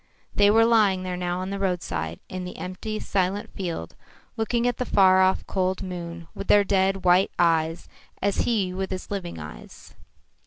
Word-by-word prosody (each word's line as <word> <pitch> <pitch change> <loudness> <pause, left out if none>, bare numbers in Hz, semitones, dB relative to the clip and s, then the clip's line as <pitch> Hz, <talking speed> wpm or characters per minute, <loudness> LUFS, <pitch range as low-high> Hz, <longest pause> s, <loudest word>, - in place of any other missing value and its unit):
They 205 0 +5
were 225 +2 +5
lying 210 -5 +3
there 180 -1 -3
now 180 0 -2
at 190 - -5
the 200 - -3
roadside, 90 - -2
in 185 0 -5
the 180 - -7
empty, 215 +4 -5
silent 195 +1 -1
field, 170 - -5 0.4
looking 235 +2 0
at 245 - -1
the - - -1
far 190 -3 +5
off 190 0 +2
cold 185 0 -1
moon 170 -2 -6
with 195 - -7
their 205 - +6
dead, 195 -1 +1
white 180 +2 +5
eyes 165 -1 +1 0.3
as 200 -1 0
he 200 -6 0
with 190 +1 -3
his 185 +1 -6
living 190 - -4
eyes. 75 -6 -11
185 Hz, 180 wpm, -25 LUFS, 175-200 Hz, 0.4 s, their